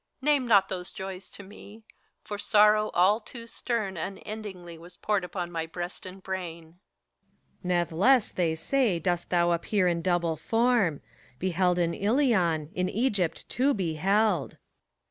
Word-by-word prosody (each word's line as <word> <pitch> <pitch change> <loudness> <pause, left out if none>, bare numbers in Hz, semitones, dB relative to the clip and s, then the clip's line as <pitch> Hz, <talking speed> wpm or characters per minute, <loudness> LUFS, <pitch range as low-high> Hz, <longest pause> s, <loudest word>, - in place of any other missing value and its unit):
Name 280 -2 +1
not 200 -4 +5
those 180 -1 -5
joys 190 0 -8
to 200 - -11
me 210 +2 -14
I - - -24 0.3
for 205 -1 -6
sorrow 210 +1 +4
all 190 +5 +4
too 230 +1 -11
stern 225 -5 -3
Unendingly 190 -1 -7
was 175 +1 -14
poured 205 -3 0
upon 180 -1 -5
my 165 -1 -3
breast 175 +3 -7
and 185 +1 -11
brain. 170 -3 -6 0.8
PHORKYAS. - - -33
Nathless, 180 +8 +2
they 165 -3 0
say, 225 +3 +1
dost 175 +1 -1
thou 175 -1 +2
appear 180 +3 +1
in 170 -1 0
double 170 -2 0
form; 225 - +1 0.3
Beheld 180 +2 +1
in 170 -1 +1
Ilion, 200 - +1
— - - -27
^in 185 0 0
Egypt, 205 -7 -1
too, 275 +3 +1
beheld. 190 0 0
185 Hz, 150 wpm, -27 LUFS, 175-215 Hz, 0.8 s, not